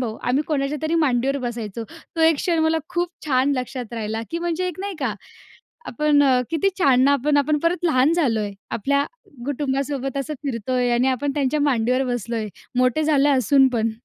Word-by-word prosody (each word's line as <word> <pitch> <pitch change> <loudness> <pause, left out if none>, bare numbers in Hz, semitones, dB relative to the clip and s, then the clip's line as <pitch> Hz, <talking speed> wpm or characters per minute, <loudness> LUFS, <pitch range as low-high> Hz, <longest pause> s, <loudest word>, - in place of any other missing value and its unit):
भाऊ 225 -3 -3
आम्ही 265 +4 +2
कोणाच्यातरी 300 +2 -1
मांडीवर 275 -3 +1
बसायचो. 235 -3 -5 0.3
तो 325 - -1
एक 320 -1 +5
क्षण 335 +2 0
मला 320 0 +2
खूप 350 0 -1 0.2
छान 265 0 +2
लक्षात 250 -2 -5
राहिला, 220 -1 -3
की 335 - -2
म्हणजे 345 +1 -2
एक 360 0 -7
नाही 400 -1 -4
का 255 -7 -1 0.7
आपण 290 +3 +2
अ, 260 -2 +4
किती 330 +4 +1
छान! 270 -8 +4
ना, 280 - +5
आपण-आपण 290 +2 +2
परत 345 +3 -1
लहान 285 -1 +3
झालोय. 225 -11 +1 0.2
आपल्या 280 +5 +1 0.4
कुटुंबासोबत 275 -1 -2
असं 300 +3 -3
फिरतोय 250 0 -1
आणि 250 +2 +2
आपण 275 +2 -1
त्यांच्या 290 +1 0
मांडीवर 255 -2 +1
बसलोय. 230 -1 -3 0.3
मोठे 255 +4 +2
झाले 290 -2 +3
असून 270 0 +4
पण. 230 -3 0
275 Hz, 170 wpm, -22 LUFS, 245-300 Hz, 0.7 s, एक